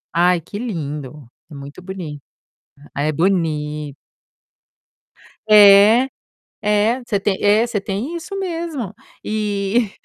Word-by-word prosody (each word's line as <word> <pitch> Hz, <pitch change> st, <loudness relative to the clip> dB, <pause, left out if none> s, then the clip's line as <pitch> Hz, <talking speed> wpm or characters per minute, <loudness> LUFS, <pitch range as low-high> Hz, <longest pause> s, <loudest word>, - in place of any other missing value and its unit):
Ai 175 Hz, 0 st, +3 dB
que 205 Hz, +6 st, -8 dB
lindo, 150 Hz, -, -6 dB, 0.2 s
é 150 Hz, -, -11 dB
muito 140 Hz, +5 st, -10 dB
boni 180 Hz, -6 st, -7 dB, 0.7 s
ah, 140 Hz, -, -2 dB
é 155 Hz, -, 0 dB
boni 150 Hz, -4 st, -1 dB, 1.6 s
É, 210 Hz, +4 st, +7 dB, 0.6 s
é. 210 Hz, +4 st, +1 dB
Você 205 Hz, -4 st, 0 dB
tem 195 Hz, -1 st, -1 dB
é 210 Hz, +3 st, +4 dB
você 220 Hz, -4 st, -2 dB
tem 205 Hz, -, -4 dB
isso 395 Hz, +4 st, -7 dB
mesmo. 330 Hz, -, -4 dB, 0.3 s
Eh, 210 Hz, +1 st, -1 dB
200 Hz, 115 wpm, -19 LUFS, 155-220 Hz, 1.6 s, É